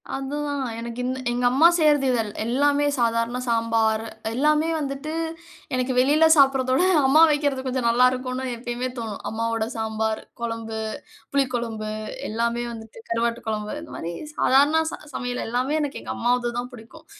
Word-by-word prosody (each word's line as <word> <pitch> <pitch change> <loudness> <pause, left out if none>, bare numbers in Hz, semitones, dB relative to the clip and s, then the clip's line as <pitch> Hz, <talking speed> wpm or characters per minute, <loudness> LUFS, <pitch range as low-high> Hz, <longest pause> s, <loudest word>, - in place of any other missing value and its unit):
அதுதான் 285 +1 -3 0.2
எனக்கு 235 +1 -6
இந்த 260 +1 -2
எங்க 245 +1 0
அம்மா 285 +6 +6
செய்றது 300 -4 +4
இதல் 225 -4 0 0.2
எல்லாமே 285 +4 +2
சாதாரண 230 0 +1
சாம்பார் 225 -1 +1 0.3
எல்லாமே 300 +5 +2
வந்துட்டு 285 +1 -4 0.6
எனக்கு 255 0 0
வெளில 295 +5 +5
சாப்ட்றதோட 270 +1 +4 0.2
அம்மா 300 +4 +6
வைக்கிறது 285 -3 0
கொஞ்சம் 255 -2 -1
நல்லாருக்குனு 255 +2 +2
எப்பயுமே 240 +1 -4
தோணும். 220 -3 -5
அம்மாவோட 225 0 -1
சாம்பார், 220 0 -2 0.2
கொழம்பு, 230 -1 -4 0.5
புளி 280 -1 +3
கொழம்பு 225 -3 -3 0.4
எல்லாமே 235 +2 -1
வந்துட்டு 225 -1 -10
கருவாட்டு 230 +1 -1
கொழம்பு 210 +2 -3
இந்த 315 - -11
மாரி 170 +1 -5 0.2
சாதாரண 290 +4 +4
ச - - -4 0.2
சமையல் 245 0 -3
எல்லாமே 255 +6 0
எனக்கு 290 -1 -4
எங்க - - -6
அம்மாதுது 240 0 0
தான் 245 +1 -6
புடிக்கும். 225 -1 -13
245 Hz, 145 wpm, -24 LUFS, 230-275 Hz, 0.6 s, அம்மா